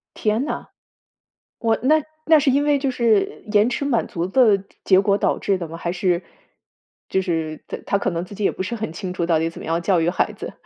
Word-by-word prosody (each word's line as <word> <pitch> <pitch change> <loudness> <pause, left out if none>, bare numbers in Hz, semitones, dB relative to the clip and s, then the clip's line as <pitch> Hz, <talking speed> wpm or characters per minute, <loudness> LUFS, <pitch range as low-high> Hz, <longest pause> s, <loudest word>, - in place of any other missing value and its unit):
天 215 +4 0
呐， 300 - -4 0.9
哇， 225 -2 +1
那 305 +4 +4 0.2
那 320 -1 +7
是 280 -1 +3
因 280 +2 +2
为 290 -1 +3
就 270 -1 0
是 230 -5 +1
延 210 +3 +4
迟 280 +3 -2
满 250 -5 +1
足 170 0 -3
的 210 -2 +4 0.2
结 190 -1 +5
果 200 0 +2
导 - - +1
致 195 -2 0
的 170 -3 -5
吗？ 165 - -7
还 170 +1 -3
是 180 -1 0 0.9
就 190 - +1
是 160 -4 -3
他 - - -4
他 200 - +1
可 200 - -1
能 170 0 -3
自 200 - -11
己 210 - -4
也 - - +3
不 - - -4
是 205 +5 -4
很 215 -7 -4
清 180 +2 -5
楚 170 - -1
到 165 -2 +3
底 165 +1 0
怎 - - -11
么 - - -8
样 165 +1 0
教 180 -1 +2
育 165 +1 +2
孩 - - 0
子。 - - -7
195 Hz, 260 characters per minute, -22 LUFS, 170-240 Hz, 0.9 s, 那